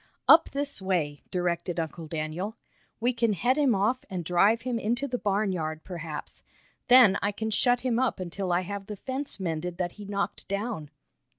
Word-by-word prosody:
"Up 320 +1 +8
this 280 -5 -1
way," 165 -7 -1
directed 175 -1 -1
Uncle 160 0 -4
Daniel. 165 +7 -3 0.4
"We 245 +2 +1
can 230 -2 +1
head 240 +8 +2
him 275 -6 +3
off 215 +7 +1
and 180 -3 -4
drive 200 +7 +3
him 250 -2 -1
into 240 +6 -1
the 245 -2 -3
barnyard, 185 -6 -1
perhaps. 165 -4 -7 0.5
Then 245 -6 +7
I 205 - +1
can 220 +2 -3
shut 245 +3 +3
him 245 -2 +1
up 260 -5 0
until 185 +1 -3
I 175 +1 +3
have 200 +1 -6
the 210 - -5
fence 260 +3 -5
mended 170 -1 -3
that 175 -2 -1
he - - -7
knocked 200 0 -3
down." 200 -6 -3
200 Hz, 180 wpm, -28 LUFS, 175-235 Hz, 0.5 s, Up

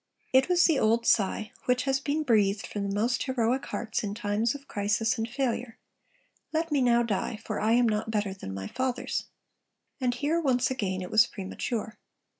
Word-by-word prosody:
It 265 +5 +5
was 355 -1 +5
the 315 -5 +3
old 230 +2 +2
sigh, 215 0 +2
which 250 0 +2
has 270 -1 +1
been 290 +3 -1
breathed 210 -6 +2
from 200 -1 -3
the 195 - -2
most 230 +3 +1
heroic 255 0 0
hearts 220 -1 -3
in 205 -1 -3
times 220 +2 0
of 280 -1 -10
crisis 210 +3 0
and 225 +1 -2
failure; 245 -2 -2 0.7
'Let 325 0 -1
me 285 -2 +2
now 240 -1 +4
die, 215 -1 -2
for 215 - -3
I 220 +2 +2
am 240 0 +4
not 215 0 -1
better 205 -3 -1
than 190 - -8
my 95 0 -5
fathers!' 255 - -2 0.7
And 250 -2 0
here 300 +6 0
once 255 -4 +2
again 190 -7 -2
it 180 - -8
was 220 +2 +6
premature. 215 +3 -5
230 Hz, 190 wpm, -28 LUFS, 210-260 Hz, 0.7 s, was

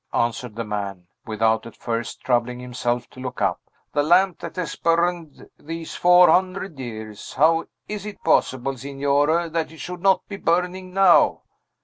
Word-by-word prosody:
answered 120 -1 -1
the 115 - -3
man, 100 -4 -5 0.2
without 110 +1 +1
at - - -13
first 115 0 -4
troubling 125 -1 0
himself 120 -1 -2
to - - -15
look 130 -1 -6
up. - - 0 0.3
"The 145 - +2
lamp 180 +4 +3
that - - -7
has 180 -2 -3
burned 170 -2 0
these 165 +1 -7
four 180 0 +6
hundred 185 -2 +1
years! 110 -4 -7
How 165 +2 +3 0.2
is 210 -1 -5
it 210 - -9
possible, 130 +1 +1
Signore, 140 +5 +1
that 160 -1 -2
it 160 - -13
should 180 +4 -7
not 195 0 +3
be 200 - -6
burning 180 +1 -1
now?" 190 -1 +5
150 Hz, 160 wpm, -23 LUFS, 120-180 Hz, 0.3 s, four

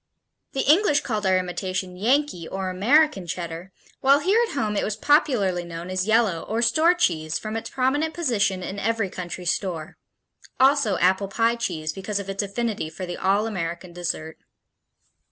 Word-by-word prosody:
The 270 - 0
English 300 0 +4
called 210 -5 -2
our 185 0 +4
imitation 185 0 -3
Yankee, 230 - 0
or 190 -1 -3
American, 215 - +3
Cheddar, 170 +2 -5 0.3
while 275 +1 +5
here 400 +9 +3
at - - -8
home 215 -7 -1
it - - 0
was 210 - -2
popularly 235 - +2
known 170 +1 -7
as 185 +1 -1
yellow 220 -7 +2
or 225 +2 -2
store 330 +8 +4
cheese 160 - 0
from 215 0 -5
its 225 - -4
prominent 290 +5 0
position 210 - 0
in 200 +2 -5
every 220 -2 -1
country 180 0 -6
store; 170 -3 -2 0.6
also 265 -7 +4
apple 190 +2 +2
pie 230 +4 +1
cheese 160 -9 -3
because 200 +1 -3
of 195 -1 -5
its 195 - -2
affinity 205 -3 -3
for 185 +3 -6
the 175 0 -5
all 200 +3 +2
American 175 -4 -4
dessert. 160 -2 -4
200 Hz, 170 wpm, -24 LUFS, 180-240 Hz, 0.6 s, while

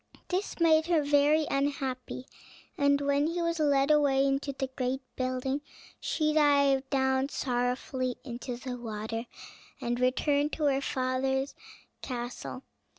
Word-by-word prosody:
This 370 +2 -2
made 320 -1 +4
her 335 -4 +3
very 290 +2 +4
unhappy, 270 -2 -2 0.5
and 280 0 +3
when 285 +1 +2
he 340 +2 -2
was 335 -1 0
led 285 -1 +3
away 280 -2 +4
into 275 +1 0
the 270 0 -3
great 260 +1 -1
building, 255 +2 -1 0.4
she 305 -1 0
dived 280 -3 +4
down 265 0 +1
sorrowfully 250 0 -1
into 245 -1 -5
the 250 0 -5
water, 225 +1 -4 0.5
and 240 +1 -2
returned 285 +4 +2
to 310 - -2
her 275 -2 +3
father's 265 +1 -1 0.5
castle. 250 +1 -5
275 Hz, 130 wpm, -29 LUFS, 255-290 Hz, 0.5 s, made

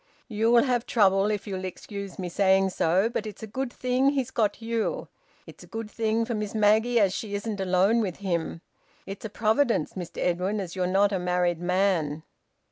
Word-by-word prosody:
"You'll 230 +1 +3
have 245 -3 0
trouble, 195 -2 +3
if 210 -1 -2
you'll 190 -3 -5
excuse 195 +1 -7
me 185 - -4
saying 190 +1 +3
so. 180 +5 +2
But 230 -2 -3
it's 210 +1 -9
a - - -2
good 250 +4 -4
thing 255 +2 +1
he's 270 -3 -1
got 215 -3 0
you. 230 - -2 0.4
It's - - -13
a - - -14
good 225 -1 -6
thing 225 0 0
for 235 - -3
Miss 210 -1 -4
Maggie 220 +3 +3
as 195 -3 +3
she 205 -1 -4
isn't 205 0 -4
alone 190 +5 +3
with 185 -6 -2
him. 170 -4 -3 0.4
It's 195 +3 -8
a - - -4
providence, 220 - +1
Mr 180 -3 -7
Edwin, 180 +4 0
as 185 -3 -5
you're 180 -1 0
not 195 +2 +3
a 190 - 0
married 180 -1 0
man." 175 -5 0
205 Hz, 195 wpm, -26 LUFS, 185-225 Hz, 0.4 s, You'll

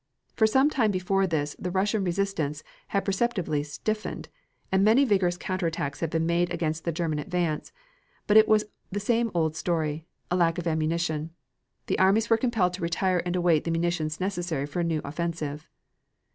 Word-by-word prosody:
For 220 - +4
some 265 +6 +3
time 235 -7 +2
before 195 0 +1
this 150 -4 -1
the 180 - -3
Russian 200 +3 +1
resistance 175 -5 -1 0.2
had 200 - -1
perceptibly 190 -7 0
stiffened, 215 +9 -4 0.4
and 190 0 +3
many 230 +7 +5
vigorous 190 -6 +2
counter 185 -1 -2
attacks 145 -3 -3
had 165 - -1
been 160 +1 0
made 170 +1 +1
against 160 -2 -2
the 170 - +1
German 160 -2 -1
advance, 170 -2 -2 0.5
but 210 - +2
it 220 0 +8
was 215 -1 +4 0.3
the 205 - -2
same 230 +3 +1
old 160 -2 +1
story, 160 -2 -2 0.2
the - - +3
lack 165 -2 +2
of 175 - -4
ammunition. 160 0 -1 0.5
The - - -1
armies 205 +5 +3
were 225 - +6
compelled 225 -7 +1
to 180 - -6
retire 175 +2 +1
and 175 - -1
await 175 -4 +3
the - - -3
munitions 165 -2 -1
necessary 175 -6 -2
for 145 +4 -5
a - - +1
new 165 -2 0
offensive. 155 -1 -4
175 Hz, 180 wpm, -27 LUFS, 160-195 Hz, 0.5 s, it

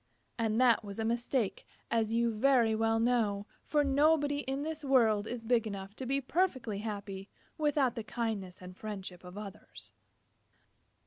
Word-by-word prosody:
And 225 0 +1
that 235 -3 +5
was 200 -1 -7
a 225 - -1
mistake, 235 -3 0 0.3
as 225 -1 +1
you 235 0 +2
very 235 -1 +4
well 225 +1 +2
know, 225 -4 +1 0.2
for 295 -1 +2
nobody 290 +1 +3
in 275 0 -3
this 315 0 -4
world 225 -6 +3
is 240 -1 -5
big 230 -1 +2
enough 200 -1 -6
to 260 - -5
be 275 +2 +1
perfectly 265 - 0
happy 200 -2 -5 0.3
without 290 -5 +2
the 230 -3 -5
kindness 210 -6 -4
and 180 0 -9
friendship 190 -4 -7
of 180 +2 -10
others. 205 -2 -9
230 Hz, 155 wpm, -32 LUFS, 205-265 Hz, 0.3 s, that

